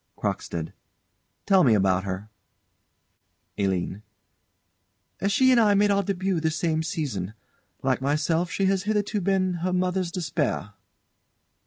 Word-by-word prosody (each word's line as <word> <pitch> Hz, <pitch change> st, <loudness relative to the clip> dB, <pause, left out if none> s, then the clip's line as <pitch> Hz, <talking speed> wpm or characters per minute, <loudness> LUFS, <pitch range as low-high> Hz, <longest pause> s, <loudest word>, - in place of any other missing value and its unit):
CROCKSTEAD. 80 Hz, -2 st, -3 dB, 0.7 s
Tell 190 Hz, -2 st, +5 dB
me 120 Hz, -6 st, +5 dB
about 95 Hz, -1 st, +2 dB
her. 95 Hz, +3 st, -5 dB, 1.3 s
ALINE. 95 Hz, 0 st, -1 dB, 1.3 s
She 260 Hz, +6 st, +4 dB
and 250 Hz, -, +5 dB
I 210 Hz, -3 st, +4 dB
made 205 Hz, +1 st, +4 dB
our 200 Hz, 0 st, +3 dB
debut 190 Hz, -2 st, -1 dB
the 160 Hz, 0 st, +1 dB
same 160 Hz, 0 st, 0 dB
season. 125 Hz, -, -3 dB, 0.5 s
Like 130 Hz, -1 st, +1 dB
myself 155 Hz, +5 st, 0 dB
she 195 Hz, -, 0 dB
has 190 Hz, 0 st, +2 dB
hitherto 210 Hz, 0 st, 0 dB
been 185 Hz, 0 st, +1 dB
her 185 Hz, +1 st, 0 dB
mother's 180 Hz, -1 st, 0 dB
despair. 155 Hz, -, -2 dB
170 Hz, 125 wpm, -25 LUFS, 125-195 Hz, 1.3 s, Tell